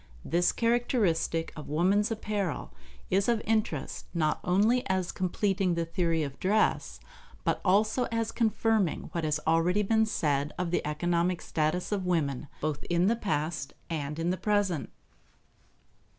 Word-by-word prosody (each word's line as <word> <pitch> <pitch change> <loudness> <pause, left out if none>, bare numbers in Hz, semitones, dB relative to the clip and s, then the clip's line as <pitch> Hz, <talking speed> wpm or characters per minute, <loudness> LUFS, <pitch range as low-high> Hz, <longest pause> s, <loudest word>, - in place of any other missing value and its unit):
This 175 +2 +2
characteristic 225 -9 +1
of 150 - -8
woman's 190 +7 +2
apparel 205 - -3 0.4
is 195 +4 +2
of 235 -2 +3
interest, 215 - -1
not 155 -2 +1
only 210 +7 +3
as 185 -2 0
completing 190 0 0
the 170 0 -1
theory 165 -2 0
of 140 -2 -6
dress, 210 +3 +1 0.4
but - - 0
also 215 +6 +3
as 230 -1 -2
confirming 220 -5 +1
what 170 - -2
has 150 -1 0
already 170 +5 +3
been 220 +2 +2
said 145 -7 0
of 175 -2 -2
the - - +1
economic 170 +3 0
status 160 +5 -1
of 195 -3 -1
women, 145 -5 0
both 150 -1 -2
in 175 +1 +2
the 225 +4 +3
past 160 -9 -2 0.2
and 150 -2 -3
in 165 +2 0
the 185 - -1
present. 200 - 0
180 Hz, 145 wpm, -29 LUFS, 160-210 Hz, 0.4 s, of